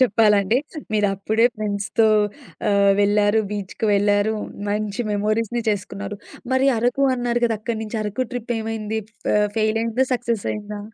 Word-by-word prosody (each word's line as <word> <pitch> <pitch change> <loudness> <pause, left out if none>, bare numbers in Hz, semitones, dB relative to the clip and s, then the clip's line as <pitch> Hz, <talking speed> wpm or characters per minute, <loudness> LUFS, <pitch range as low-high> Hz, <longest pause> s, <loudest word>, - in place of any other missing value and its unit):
చెప్పాలంటే. 215 -2 +4 0.3
మీరప్పుడే 210 +2 +2
ఫ్రెండ్స్‌తో 210 +1 +1 0.6
ఆహ్, 200 0 +4
వెళ్లారు, 205 +1 +3
బీచ్‌కి 205 +2 -3
వెళ్లారు. 205 +1 +2 0.4
మంచి 210 +1 -2
మెమోరీస్‌ని 215 +3 0
చేసుకున్నారు. 200 0 -4 0.4
మరి 265 +1 +3
అరకు 245 +4 +1
అన్నారు 240 -1 -1
గదా! 225 -2 -1
అక్కడినుంచి 220 0 -3
అరకు 220 +4 -2
ట్రిప్పేమైంది? 225 -2 -3 0.4
ఆహ్, 210 0 +3
ఫెయిలయిందా? 225 +3 +1
సక్సెసయిందా? 210 -3 -2
215 Hz, 110 wpm, -22 LUFS, 205-230 Hz, 0.6 s, చెప్పాలంటే